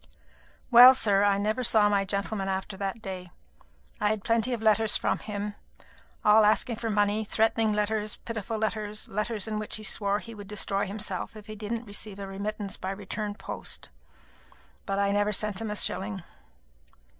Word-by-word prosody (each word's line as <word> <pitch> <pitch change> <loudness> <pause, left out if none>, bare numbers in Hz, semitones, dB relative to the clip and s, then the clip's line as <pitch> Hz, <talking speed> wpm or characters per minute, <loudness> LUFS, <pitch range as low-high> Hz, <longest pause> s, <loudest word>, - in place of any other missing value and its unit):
Well, 250 +2 +10
sir, 200 -5 +3
I 200 -1 +3
never 215 +5 -1
saw 220 -3 +5
my 200 -1 +1
gentleman 200 0 -2
after 190 +1 -3
that 200 +3 -4
day. 185 -2 -6 0.7
I 210 - +1
had 215 -2 -2
plenty 230 +1 +1
of 240 - -1
letters 220 -1 +4
from - - -1
him, 210 -1 -5 0.7
all 215 +1 +7
asking 215 +2 +2
for 230 0 -3
money; 205 0 +1
threatening 225 +1 +1
letters, 210 0 -1
pitiful 225 -1 -5
letters, 215 -1 -3
letters 210 +1 -2
in 215 -1 -2
which 215 - -2
he 215 - -4
swore 200 -1 +1
he 230 +2 -9
would 205 -2 -10
destroy 200 -1 0
himself 205 0 -4
if 210 -1 -11
he 215 -1 -8
didn't 225 +3 -4
receive 205 -1 -5
a 200 - -6
remittance 200 +1 -5
by 185 - -5
return 205 +2 -4
of 205 - -8
post; - - -6 1.0
but 195 -1 -1
I 200 0 +2
never 205 +1 +1
sent 210 0 0
him 225 - -3
a 210 - -3
shilling. 195 -2 -1
210 Hz, 180 wpm, -27 LUFS, 200-220 Hz, 1.0 s, Well